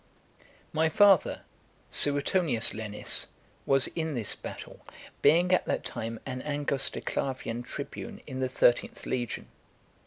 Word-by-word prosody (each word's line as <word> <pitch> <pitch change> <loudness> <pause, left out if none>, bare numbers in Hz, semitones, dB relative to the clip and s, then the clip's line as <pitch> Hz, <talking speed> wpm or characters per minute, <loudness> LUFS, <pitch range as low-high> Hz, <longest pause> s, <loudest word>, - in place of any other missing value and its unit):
X. - - -26 0.3
My 160 +1 +2
father, 195 +1 +4 0.5
Suetonius 145 -3 +3
Lenis, 105 -1 0 0.4
was 135 -1 +4
in 160 -3 -3
this 110 -6 +1
battle, - - -9 0.4
being 175 +5 +5
at 185 - +3
(424) - - +1
that - - -9
time 115 -1 -4
an 130 -1 -4
angusticlavian 135 -4 -2
tribune - - -7
in 130 - -6
the 130 -1 0
thirteenth 120 -1 +2
legion. 120 -3 -3
135 Hz, 125 wpm, -29 LUFS, 120-160 Hz, 0.5 s, being